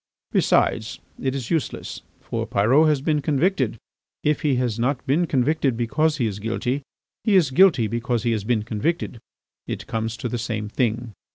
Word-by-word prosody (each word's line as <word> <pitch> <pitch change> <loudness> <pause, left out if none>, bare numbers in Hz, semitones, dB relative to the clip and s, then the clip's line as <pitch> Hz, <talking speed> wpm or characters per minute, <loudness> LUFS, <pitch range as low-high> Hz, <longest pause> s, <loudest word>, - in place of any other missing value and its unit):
Besides, - - +2 0.2
it 130 0 -1
is 130 -4 -4
useless, 160 -5 -2 0.2
for - - -3
Pyrot 130 +10 +4
has 150 -3 +2
been 150 0 +1
convicted. 140 - +1 0.5
If 150 0 +1
he 145 -4 +2
has 120 -3 -1
not 125 +2 0
been 155 +6 +2
convicted 135 -2 +1
because 150 +6 +1
he 125 - +1
is 105 -2 -3
guilty, 120 +5 -2 0.4
he 210 - +3
is 165 -8 +4
guilty 165 -6 +5
because 115 +1 -1
he 120 - +1
has 110 -3 -1
been 110 -1 +1
convicted; 120 +4 -2 0.5
it - - -4
comes 115 0 -3
to 120 - -3
the 120 0 -3
same 110 -2 -3
thing. 115 -1 -1
125 Hz, 175 wpm, -23 LUFS, 115-150 Hz, 0.5 s, guilty